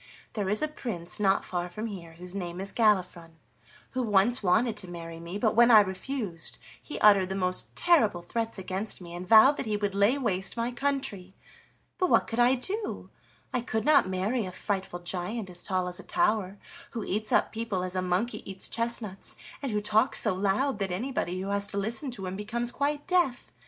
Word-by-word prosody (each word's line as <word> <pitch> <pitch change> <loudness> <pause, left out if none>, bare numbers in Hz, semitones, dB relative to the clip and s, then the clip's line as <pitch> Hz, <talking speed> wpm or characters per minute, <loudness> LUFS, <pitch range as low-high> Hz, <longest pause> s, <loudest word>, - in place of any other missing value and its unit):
There 205 -3 -2
is 210 +8 +2
a - - +2
prince 200 - -5
not 195 -1 +2
far 175 -1 -3
from 215 +6 -5
here 180 -7 -7
whose 180 +2 -8
name 175 -2 -5
is 195 +1 -5
Galifron, 180 -7 +1 0.6
who 255 - -1
once 220 +2 +3
wanted 215 +4 +2
to 190 - -3
marry 165 -1 -8
me, 170 +3 -6
but 215 +1 +1
when 235 +1 +6
I 220 -3 +9
refused 190 -2 -4 0.2
he 300 - -7
uttered 200 -3 +6
the 190 - -2
most 185 -1 -1
terrible 225 - +3
threats 225 +5 -2
against 190 +3 -3
me, 170 -2 -10
and 175 +1 -6
vowed 230 +7 +7
that - - -3
he 210 -1 0
would 205 -1 -1
lay 200 +7 +3
waste 195 -6 -2
my 235 +1 -1
country. 245 -8 -2 0.6
But 365 - +2
what - - +4
could 225 - -4
I 245 +2 +5
do? 400 - -4 0.4
I 250 - +1
could 220 -2 -2
not 290 -10 +5
marry 200 +6 0
a - - -6
frightful 190 -2 -3
giant 185 +3 -3
as 175 0 -10
tall 185 -1 -1
as 180 +1 -5
a - - -9
tower, 220 - 0 0.4
who 225 - -2
eats 215 +2 -2
up - - +3
people 220 -5 -2
as 185 0 -3
a 185 - +1
monkey 185 +6 -1
eats 190 -1 -3
chestnuts, 230 -4 -2 0.3
and 275 -4 -2
who 210 0 0
talks 215 +4 +3
so 215 - +2
loud 205 +6 0
that 195 -1 -1
anybody 185 -2 -2
who 195 +1 -4
has 200 0 0
to 200 - -4
listen 225 +7 -2
to 215 -6 -6
him 185 +1 -4
becomes 235 +4 -2
quite 290 +2 -1
deaf. 350 -9 +1
205 Hz, 205 wpm, -28 LUFS, 185-235 Hz, 0.6 s, I